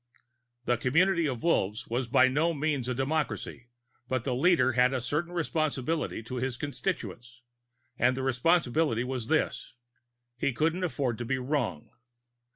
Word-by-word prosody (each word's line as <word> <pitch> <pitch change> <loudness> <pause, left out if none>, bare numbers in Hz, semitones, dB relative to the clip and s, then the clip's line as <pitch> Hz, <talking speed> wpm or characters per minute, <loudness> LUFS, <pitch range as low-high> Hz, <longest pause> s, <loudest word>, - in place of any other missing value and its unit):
The 120 - +2
community 165 - +2
of 125 -4 -4
Wolves 115 - +1
was 120 +2 -1
by 130 +2 +5
no 160 +6 +1
means 145 -4 -1
a 125 - -1
democracy, 135 -2 -2 0.4
but 130 -2 0
the 130 - -1
leader 165 +1 +3
had 125 +1 +3
a - - 0
certain 150 +8 -2
responsibility 155 -5 -1
to 125 +3 -6
his 125 0 -2
constituents, 125 -6 -5 0.6
and 125 +1 +3
the 130 - -2
responsibility 130 -1 +2
was 125 -3 -4
this: 155 -4 -1 0.6
He 135 - 0
couldn't 165 +8 0
afford 135 -9 -1
to 120 - -3
be 130 +3 0
wrong. 125 - -2
130 Hz, 150 wpm, -29 LUFS, 125-155 Hz, 0.6 s, by